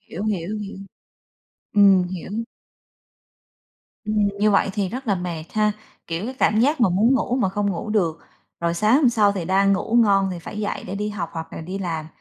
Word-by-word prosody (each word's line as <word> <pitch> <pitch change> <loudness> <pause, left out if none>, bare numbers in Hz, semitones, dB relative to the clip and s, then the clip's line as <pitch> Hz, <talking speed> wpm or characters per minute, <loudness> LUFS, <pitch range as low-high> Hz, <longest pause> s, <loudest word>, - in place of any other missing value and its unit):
hiểu, 205 - -7
hiểu, 205 0 -2
hiểu. 200 -2 -7 0.9
Ừm, 200 -2 +6
hiểu. 180 0 -6 1.7
Ừm, 215 0 -2 0.2
như 210 +1 +3
vậy 195 0 +3
thì 200 -2 -1
rất 255 +6 -6
là 205 - +2
mệt 175 -3 -4
ha, 210 -1 +2 0.3
kiểu, 165 +4 -3
cái 255 +3 -5
cảm 215 -3 +3
giác 285 +4 +2
mà 230 - +5
muốn 210 +8 +3
ngủ 255 -1 0
mà 245 -7 +1
không 205 +1 -1
ngủ 195 +4 -4
được, 175 -7 +1 0.4
rồi 170 0 0
sáng 215 +7 +3
hôm 280 -3 +4
sau 215 -4 +3
thì 190 -4 -4
đang 195 +3 +3
ngủ 195 +4 -1
ngon 195 -3 +3
thì 175 - -5
phải 170 +5 -8
dậy 205 - -3
để 190 - -5
đi 210 +1 -2
học 205 -5 -4
hoặc 165 -1 -7
là - - -6
đi 185 +4 -5
làm, 165 -5 -3
200 Hz, 205 wpm, -22 LUFS, 180-215 Hz, 1.7 s, Ừm